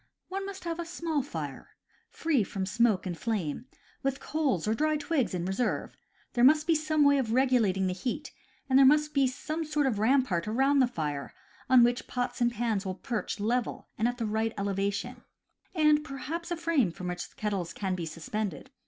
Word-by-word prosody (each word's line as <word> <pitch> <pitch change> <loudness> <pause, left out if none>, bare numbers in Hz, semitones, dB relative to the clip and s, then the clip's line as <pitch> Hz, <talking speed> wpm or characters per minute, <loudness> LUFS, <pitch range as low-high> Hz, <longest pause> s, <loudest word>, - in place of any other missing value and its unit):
One 390 +1 -3
must 390 -1 -8
have 335 -1 -3
a - - -1
small 330 -3 -1
fire, 280 - -7 0.3
free 305 -9 +1
from 195 -2 -3
smoke 210 -1 +2
and 180 -2 -3
flame, 210 - -3 0.3
with 275 0 -1
coals 275 - -1
or 215 - +3
dry 305 +5 +1
twigs 290 - 0
in 175 -1 -2
reserve; 195 +6 -1 0.4
there 240 - +2
must 300 +3 +6
be 335 - +3
some 310 -1 +2
way 285 -1 +5
of 230 -4 -1
regulating 235 -7 +3
the 185 - 0
heat; 250 +10 -4 0.4
and 265 0 +5
there - - +8
must 300 +1 +4
be 275 -2 +4
some 310 +5 -3
sort 300 -2 0
of 235 -6 0
rampart 220 -6 +2
around 270 +6 +3
the 255 - +5
fire 150 - -4 0.3
on 255 -2 +7
which 245 +1 +1
pots 245 0 -3
and 240 0 +3
pans 225 -3 -1
will 190 -2 -3
perch 235 -1 -3
level 235 +3 -1
and 225 - +1
at 245 0 -2
the 230 - -2
right 220 +1 0
elevation, 200 0 -2 0.5
and 300 -2 +4
perhaps 310 +4 -5
a 345 - -2
frame 330 - +2
from 180 +2 -7
which 180 0 -5
kettles 195 -5 -2
can 190 +1 -2
be 175 -3 -3
suspended. 205 - -4
245 Hz, 195 wpm, -29 LUFS, 200-295 Hz, 0.5 s, there